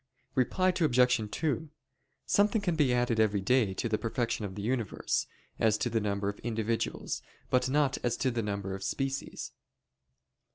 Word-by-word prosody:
Reply 185 +9 +2
Obj. 125 - +3
2: 160 +2 -1 0.6
Something 210 +1 +3
can 175 -3 +1
be 145 -5 +3
added 120 -2 +1
every 105 -2 +3
day 110 -2 +2
to - - -1
the 110 -1 0
perfection 115 -2 -1
of 95 -2 -6
the 100 - -5
universe, 115 -3 -1 0.3
as 110 -2 +3
to 120 +2 -1
the 115 -1 +1
number 100 -1 -1
of 100 0 -3
individuals, 115 -1 -2 0.3
but 125 0 +3
not 140 -1 +2
as 120 -1 0
to 130 - +1
the 120 -1 -1
number 100 -2 -3
of 95 0 -5
species. 135 +6 -3
120 Hz, 165 wpm, -30 LUFS, 105-135 Hz, 0.6 s, Obj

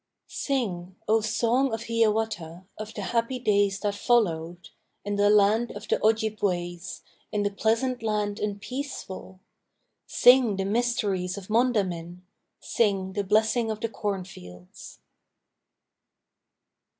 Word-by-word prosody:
Sing, 190 -10 -3
O 220 +1 +3
Song 235 +4 +1
of 225 +1 -4
Hiawatha, 220 -6 -1
Of 215 +1 -8
the 205 - -4
happy 230 +4 -1
days 205 -4 +2
that 205 -1 0
followed, 175 -7 0 0.4
In 205 0 -1
the 205 0 +3
land 210 +3 +4
of 205 +1 -9
the - - +2
Ojibways, 200 -6 -1 0.3
In 210 -1 0
the 205 - 0
pleasant 230 +5 0
land 210 -2 -1
and 205 -1 -2
peaceful! 200 -7 -7 0.7
Sing 245 -4 +5
the 195 0 -2
mysteries 200 -4 0
of 195 0 -9
Mondamin, 185 -7 0 0.4
Sing 195 -4 0
the 205 +1 -1
Blessing 220 +3 +2
of 215 -1 -3
the 230 - -1
Cornfields! 180 - -7
210 Hz, 120 wpm, -26 LUFS, 190-230 Hz, 0.7 s, Sing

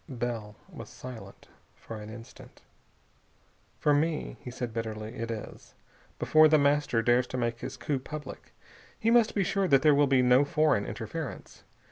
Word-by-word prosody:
Bell 120 -5 -4
was - - -10
silent 125 -3 -11 0.3
for 115 - -9
an 105 0 -9
instant. 115 +1 -13 1.1
"For 150 - +2
me," 155 +2 0
he - - -8
said 120 -2 -5
bitterly, 110 -1 -5
"it 115 0 -5
is. 110 -2 -8 0.4
Before 155 0 +5
The 155 0 +5
Master 140 -5 +2
dares 120 +1 +3
to 130 - -5
make 120 -1 -2
his - - -6
coup 145 -3 -2
public, 145 +1 -9 0.5
he 225 - +2
must 235 -2 +4
be 200 - +2
sure 195 +1 0
that 135 -4 +4
there 150 -1 +6
will 145 0 +4
be 130 -2 +3
no 125 +2 +5
foreign 150 -7 +1
interference. - - -7
130 Hz, 165 wpm, -28 LUFS, 115-150 Hz, 1.1 s, there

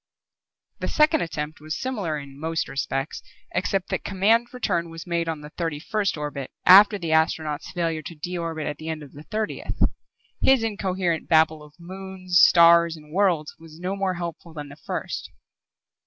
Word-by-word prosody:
The - - -2
second 305 0 +3
attempt 155 -1 -4
was 155 +1 -4
similar 210 - -2
in 140 -1 -10
most 160 +1 -2
respects, 135 +1 -3 0.3
except 195 -2 -1
that - - -2
command 215 +5 +2
return 180 -9 -1
was 165 -1 -9
made 170 -1 -1
on 160 -2 -4
the 150 0 -10
thirty 165 -3 -3
first 200 +2 -1
orbit 145 -3 -5 0.2
after 205 +3 +8
the 170 -4 -4
astronaut's 160 -1 +1
failure 165 -3 -1
to 165 +3 -9
de 175 +4 -5
orbit 165 -3 -3
at 150 - -3
the 160 +1 -6
end 155 -1 -4
of 140 - -12
the 145 - -11
thirtieth. 215 +6 -4 0.6
His 265 -3 +4
incoherent 190 -6 -1
babble 160 -1 +4
of 150 0 -15
moons, 185 0 -2
stars, 170 -1 +6
and 150 0 -15
worlds 180 -6 +1
was 160 0 -14
no 185 +2 -2
more 195 -2 -1
helpful 170 -1 -6
than 145 -1 -6
the 140 - -11
first. 155 - -5
170 Hz, 175 wpm, -24 LUFS, 155-190 Hz, 0.6 s, after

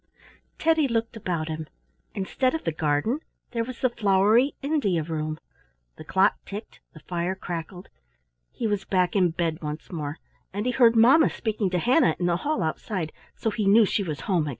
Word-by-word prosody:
Teddy 320 -2 +3
looked 230 -1 -1
about 175 -7 -3
him. 155 -1 -5 0.5
Instead 255 +8 0
of 320 - -4
the - - 0
garden 155 - 0 0.3
there 230 -2 -1
was 250 +1 -8
the 255 - +3
flowery 215 +5 +3
India 250 - +1
room. 155 -1 -3 0.6
The - - -10
clock - - +2
ticked, 210 +3 -8
the 155 - -13
fire 175 +1 -2
crackled; 175 0 -6 0.6
—he - - -5
was 205 -2 0
back 185 -1 +1
in 185 -3 +4
bed 165 -1 -2
once 150 0 -6
more, 150 -2 -4 0.3
and 205 +3 -3
he 250 - +2
heard 235 -2 +5
mamma 250 +8 +6
speaking 215 -4 -2
to 180 - 0
Hannah 250 - +3
in 175 - -1
the 175 -1 +2
hall 255 - -1
outside, 160 +1 -3 0.2
so 225 - -1
he 210 -1 -1
knew 215 +2 +7
she 205 - 0
was 155 -7 -4
home 175 -3 +1
again. - - -2
195 Hz, 185 wpm, -25 LUFS, 165-230 Hz, 0.6 s, knew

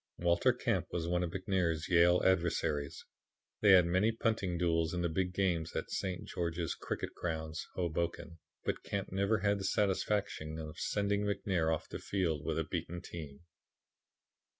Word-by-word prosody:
"Walter 85 0 +3
Camp - - -1
was 85 -1 -2
one 90 0 +1
of 90 - -1
McNair's 90 -3 0
Yale 90 0 +5
adversaries. 85 -5 +1 0.6
They 105 - +5
had 90 -2 +8
many 95 +6 +3
punting 110 -6 0
duels 85 -1 +1
in 90 - -1
the 85 - +1
big 90 +2 0
games 90 -4 0
at - - -3
St. 95 -2 -3
George's 85 -1 -2
Cricket - - -4
Grounds, 80 -1 -4
Hoboken, 85 -1 -2 0.3
but - - -1
Camp 100 -1 -4
never 100 +3 +1
had 100 0 +2
the - - -4
satisfaction 95 -5 0
of 80 -1 -7
sending 100 0 0
McNair 95 -5 0
off 80 - -2
the - - -6
field 85 -7 -1
with 80 +1 -1
a 80 - +1
beaten 85 +2 -4
team." 75 -4 -8
85 Hz, 160 wpm, -33 LUFS, 80-95 Hz, 0.6 s, had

